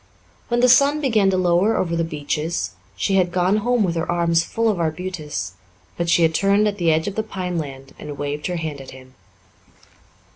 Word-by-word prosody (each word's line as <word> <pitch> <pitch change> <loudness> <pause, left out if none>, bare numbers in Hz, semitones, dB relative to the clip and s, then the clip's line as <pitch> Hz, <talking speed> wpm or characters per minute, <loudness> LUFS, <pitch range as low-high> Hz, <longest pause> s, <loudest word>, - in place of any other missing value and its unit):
When 240 0 +1
the 250 - +5
sun 280 +4 +5
began 225 -9 +2
to 190 - +1
lower 185 +4 +2
over 170 -2 -1
the 165 - 0
beeches 155 - -3 0.2
she 195 - 0
had 180 -2 +2
gone 185 +3 +2
home 240 +1 +1
with 175 -3 0
her 165 0 -2
arms 170 -1 +2
full 230 +5 -1
of 210 -5 +1
arbutus, 155 - -3 0.4
but 170 0 -2
she 170 - +4
had 160 0 +3
turned 200 +4 +3
at 205 -1 -3
the 170 -2 +3
edge 160 0 +1
of 200 - -2
the 220 - -1
pineland 170 -10 -5
and 145 -1 -7
waved 145 +1 -3
her 180 - -3
hand 155 -4 -4
at 135 - -11
him. 130 0 -14
175 Hz, 205 wpm, -21 LUFS, 155-200 Hz, 0.4 s, the